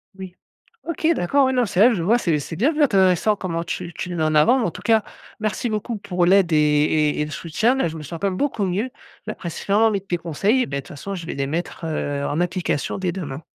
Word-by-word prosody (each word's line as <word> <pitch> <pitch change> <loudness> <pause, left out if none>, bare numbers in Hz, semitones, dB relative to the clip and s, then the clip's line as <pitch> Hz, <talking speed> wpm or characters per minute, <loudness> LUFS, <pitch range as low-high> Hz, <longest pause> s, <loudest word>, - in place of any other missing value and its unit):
Oui. 190 -2 -9 0.5
OK, 330 -1 -2
d'accord, 275 - +2
oui, 260 - +1
non, 250 -2 +2
c'est 185 -2 -1
vrai, 235 +3 +6
je 175 - -2
vois, 220 +8 +3
c'est 165 -9 +1
c'est 155 +3 -6
bien 270 - +2
intéressant 195 - +3
comment 170 -4 -3
tu 170 - -5
tu - - -5
le 175 - -4
mets 160 - 0
en 155 0 +1
avant, 155 - +5
mais 245 - 0
en - - -1
tout - - -10
cas, 225 -2 +3 0.4
merci 215 +3 -1
beaucoup 215 +1 -3
pour 180 -3 -1
l'aide 185 -1 +4
et - - +4
et 150 0 +2
et - - +1
le 150 - -7
soutien 170 - 0
là, 265 -10 0
je 160 - -7
me 155 - -7
sens 165 +3 -7
quand 200 - +1
même 185 - -3
beaucoup 265 -8 0
mieux, 195 +7 -1 0.4
la - - -4
pression 200 +5 0
avec 200 -3 -1
tes 175 - 0
conseils, 185 - +1
et - - -2
beh, 140 - -4
de - - -2
toute - - -16
façon 195 +7 -6
je 170 -3 -7
vais - - -4
les 140 0 -2
mettre, 165 +3 -4
heu, 145 -3 -2
en 150 +3 -1
application 175 -5 -1
dès 185 -2 -1
demain. 155 -6 -6
180 Hz, 265 wpm, -22 LUFS, 160-215 Hz, 0.5 s, vrai